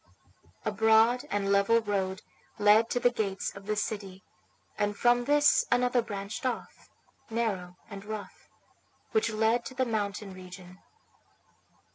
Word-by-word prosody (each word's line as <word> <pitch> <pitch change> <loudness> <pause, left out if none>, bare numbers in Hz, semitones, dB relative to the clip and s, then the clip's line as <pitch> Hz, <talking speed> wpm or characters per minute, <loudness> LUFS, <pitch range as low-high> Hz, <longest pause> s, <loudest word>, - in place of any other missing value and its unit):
A 215 - 0
broad 225 +3 +4
and 200 -1 -1
level 200 +3 +4
road 195 -3 -2 0.3
led 210 +2 +5
to 245 - 0
the 245 - +3
gates 200 -5 -3
of 200 0 -11
the 215 - 0
city, 200 -3 -4 0.5
and 205 -1 -1
from 240 0 +3
this 295 - +4
another 245 0 +3
branched 205 -2 -6
off, 255 -2 -5 0.4
narrow 195 -6 -2
and 200 -2 -9
rough, 210 -2 -8 0.6
which 440 - +1
led 220 +2 +1
to 260 - -8
the 260 0 +1
mountain 205 -3 -3
region. 185 0 -12
215 Hz, 135 wpm, -29 LUFS, 200-235 Hz, 0.6 s, led